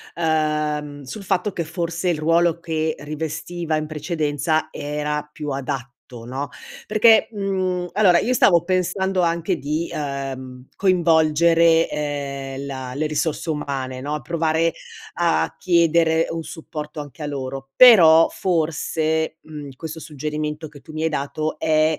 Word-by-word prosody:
ehm, 150 Hz, -3 st, -1 dB
sul 135 Hz, +11 st, -8 dB
fatto 190 Hz, +1 st, 0 dB
che 170 Hz, -, -2 dB
forse 170 Hz, +2 st, -2 dB
il 170 Hz, -, +1 dB
ruolo 165 Hz, +1 st, +2 dB
che 160 Hz, -2 st, -2 dB
rivestiva 160 Hz, +3 st, -4 dB
in 155 Hz, 0 st, -3 dB
precedenza 155 Hz, 0 st, -1 dB
era 150 Hz, 0 st, -3 dB
più 150 Hz, -1 st, -6 dB
adatto, 135 Hz, -2 st, -4 dB, 0.3 s
no, 135 Hz, +4 st, -4 dB, 0.4 s
perché, 220 Hz, +1 st, +5 dB
mhmm 195 Hz, -3 st, -1 dB, 0.2 s
allora 185 Hz, -3 st, +5 dB
io 250 Hz, -, 0 dB
stavo 175 Hz, -8 st, +5 dB
pensando 185 Hz, +1 st, 0 dB
anche 170 Hz, +1 st, 0 dB
di, 155 Hz, +4 st, -2 dB
ehm, 135 Hz, -3 st, -5 dB
coinvolgere, 165 Hz, -2 st, +4 dB
ehm, 140 Hz, -2 st, -4 dB
la 130 Hz, -2 st, -6 dB
le 155 Hz, +2 st, 0 dB
risorse 155 Hz, +2 st, -2 dB
umane, 135 Hz, -4 st, -3 dB
no, 150 Hz, +2 st, -3 dB
provare 165 Hz, +3 st, 0 dB, 0.4 s
a 170 Hz, -1 st, +1 dB
chiedere 165 Hz, -2 st, +3 dB
un 165 Hz, 0 st, -4 dB
supporto 150 Hz, -1 st, -7 dB
anche 145 Hz, +2 st, -10 dB
a -, -, -2 dB
loro; 135 Hz, -1 st, -5 dB
però 165 Hz, -10 st, +8 dB
forse, 160 Hz, -2 st, -1 dB
mhmm, 150 Hz, -2 st, -9 dB
questo 160 Hz, +3 st, -7 dB
suggerimento 150 Hz, 0 st, -4 dB
che 145 Hz, -2 st, -15 dB
tu -, -, -13 dB
mi 155 Hz, 0 st, -4 dB
hai 160 Hz, -, +2 dB
dato, 155 Hz, +1 st, -3 dB
è 155 Hz, 0 st, +2 dB
155 Hz, 135 wpm, -22 LUFS, 145-170 Hz, 0.4 s, però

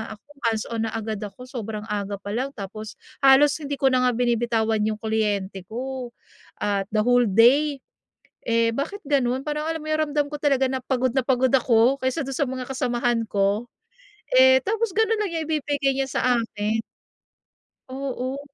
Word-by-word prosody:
ako 210 Hz, -, -29 dB, 0.2 s
hands-on 225 Hz, -1 st, -1 dB
na -, -, -5 dB
agad 220 Hz, -1 st, -3 dB
ako, 205 Hz, +3 st, -8 dB
sobrang 220 Hz, -4 st, -6 dB
aga 205 Hz, -1 st, -2 dB
pa 200 Hz, +1 st, -7 dB
lang 255 Hz, +4 st, -1 dB
tapos 215 Hz, +1 st, -7 dB, 0.3 s
halos 275 Hz, +1 st, +6 dB
hindi 285 Hz, -2 st, -4 dB
ko 270 Hz, -1 st, +2 dB
na 255 Hz, 0 st, +3 dB
nga -, -, +3 dB
binibitawan 230 Hz, -2 st, +1 dB
yung 215 Hz, -1 st, -2 dB
kliyente 210 Hz, -3 st, -1 dB
ko, 255 Hz, +2 st, -5 dB, 0.5 s
at 200 Hz, -1 st, 0 dB
the 215 Hz, -, +3 dB
whole 245 Hz, 0 st, +4 dB
day. 265 Hz, +8 st, +4 dB, 0.7 s
Eh, 230 Hz, 0 st, +2 dB
bakit 330 Hz, -, -4 dB
ganun? 265 Hz, -2 st, 0 dB
Parang 300 Hz, +1 st, -2 dB
alam 325 Hz, 0 st, -2 dB
mo 310 Hz, -, -10 dB
yung 310 Hz, -, +1 dB
nararamdam 295 Hz, 0 st, 0 dB
ko -, -, -2 dB
talaga 275 Hz, -3 st, +2 dB
na 260 Hz, -, -2 dB
pagod 255 Hz, -1 st, 0 dB
na 265 Hz, -, +2 dB
pagod 255 Hz, 0 st, +1 dB
ako 255 Hz, 0 st, +3 dB
kaysa 260 Hz, +4 st, -1 dB
dun 270 Hz, 0 st, -5 dB
sa 275 Hz, +1 st, 0 dB
mga 255 Hz, 0 st, -4 dB
kasamahan 245 Hz, -2 st, 0 dB
ko. 205 Hz, +4 st, 0 dB, 0.7 s
Eh, 260 Hz, 0 st, +7 dB
tapos 450 Hz, +2 st, 0 dB
ganun 445 Hz, 0 st, +3 dB
lang 415 Hz, -, -1 dB
niya 325 Hz, -1 st, -2 dB
ibibigay 285 Hz, -3 st, 0 dB
niya 270 Hz, 0 st, 0 dB
sa -, -, -1 dB, 0.2 s
akin? 220 Hz, 0 st, -2 dB, 1.1 s
Oo. 265 Hz, 0 st, -4 dB
250 Hz, 175 wpm, -24 LUFS, 220-275 Hz, 1.1 s, Eh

